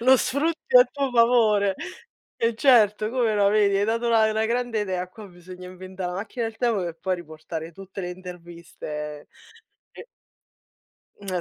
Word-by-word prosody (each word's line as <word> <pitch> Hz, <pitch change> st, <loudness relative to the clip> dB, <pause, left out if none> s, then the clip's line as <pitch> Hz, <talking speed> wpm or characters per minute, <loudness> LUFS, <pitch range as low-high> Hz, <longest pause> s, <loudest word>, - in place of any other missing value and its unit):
lo 260 Hz, +2 st, +6 dB
sfrutti 320 Hz, -, +1 dB
a -, -, +9 dB
tuo 280 Hz, -, -3 dB
favore. 225 Hz, -4 st, +3 dB, 0.6 s
E 230 Hz, 0 st, 0 dB
certo, 215 Hz, -4 st, +4 dB
come 240 Hz, -3 st, +1 dB
no, 200 Hz, -1 st, +3 dB
vedi, 205 Hz, -1 st, +3 dB
hai 200 Hz, -, +2 dB
dato 230 Hz, +2 st, -1 dB
una 225 Hz, -2 st, +4 dB
una 220 Hz, +1 st, 0 dB
grande 235 Hz, -1 st, -1 dB
idea. 185 Hz, -3 st, -3 dB
Qua 210 Hz, +3 st, -12 dB
bisogna 180 Hz, 0 st, -12 dB
inventà 185 Hz, 0 st, -7 dB
la 180 Hz, -, -4 dB
macchina 215 Hz, +5 st, -4 dB
del 225 Hz, 0 st, -7 dB
tempo 235 Hz, -4 st, +1 dB
per 170 Hz, -2 st, -5 dB
poi 190 Hz, -1 st, 0 dB
riportare 160 Hz, -1 st, -8 dB
tutte 195 Hz, +2 st, -9 dB
le 180 Hz, -, -4 dB
interviste 170 Hz, -4 st, -8 dB, 0.6 s
e -, -, -11 dB, 1.2 s
Mhmm, 185 Hz, -3 st, -3 dB
205 Hz, 165 wpm, -24 LUFS, 180-230 Hz, 1.2 s, a